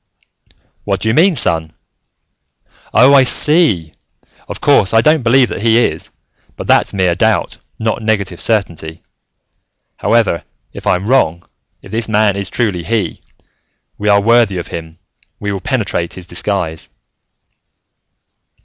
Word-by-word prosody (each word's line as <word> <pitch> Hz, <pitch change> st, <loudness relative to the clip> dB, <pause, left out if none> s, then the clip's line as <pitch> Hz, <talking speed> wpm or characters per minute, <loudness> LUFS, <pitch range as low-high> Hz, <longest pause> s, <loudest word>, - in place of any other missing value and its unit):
"What -, -, -2 dB
do 110 Hz, -, -1 dB
you -, -, +1 dB
mean, 170 Hz, +6 st, +3 dB
son? 80 Hz, -, +1 dB, 1.2 s
Oh, 130 Hz, +4 st, +5 dB
I 135 Hz, -2 st, +6 dB
see. 130 Hz, -, +3 dB, 0.5 s
Of -, -, -7 dB
course, 100 Hz, -, +2 dB
I 115 Hz, -, +6 dB
don't 155 Hz, +4 st, +3 dB
believe 125 Hz, +1 st, +3 dB
that -, -, -5 dB
he 115 Hz, 0 st, +3 dB
is, 80 Hz, -10 st, -1 dB, 0.5 s
but -, -, -7 dB
that's -, -, +2 dB
mere 95 Hz, -3 st, +1 dB
doubt, 110 Hz, +4 st, 0 dB, 0.2 s
not 110 Hz, +1 st, -2 dB
negative 100 Hz, -5 st, -2 dB
certainty. 85 Hz, -8 st, -2 dB, 0.9 s
However, 110 Hz, -7 st, +1 dB, 0.3 s
if -, -, -9 dB
I'm 90 Hz, +2 st, +1 dB
wrong, 85 Hz, -10 st, +1 dB, 0.4 s
if -, -, -13 dB
this 110 Hz, 0 st, -2 dB
man 105 Hz, -2 st, +2 dB
is 100 Hz, -1 st, -5 dB
truly 100 Hz, -8 st, -2 dB
He, 110 Hz, +2 st, -2 dB, 0.8 s
we 105 Hz, 0 st, -1 dB
are 100 Hz, 0 st, +5 dB
worthy 115 Hz, -2 st, +2 dB
of 85 Hz, -, -6 dB
him, 80 Hz, 0 st, -8 dB, 0.4 s
we 100 Hz, -1 st, -3 dB
will 100 Hz, -2 st, -4 dB
penetrate 95 Hz, -6 st, -2 dB
his 90 Hz, -, -9 dB
disguise." 85 Hz, -2 st, -3 dB
105 Hz, 140 wpm, -15 LUFS, 85-115 Hz, 1.2 s, I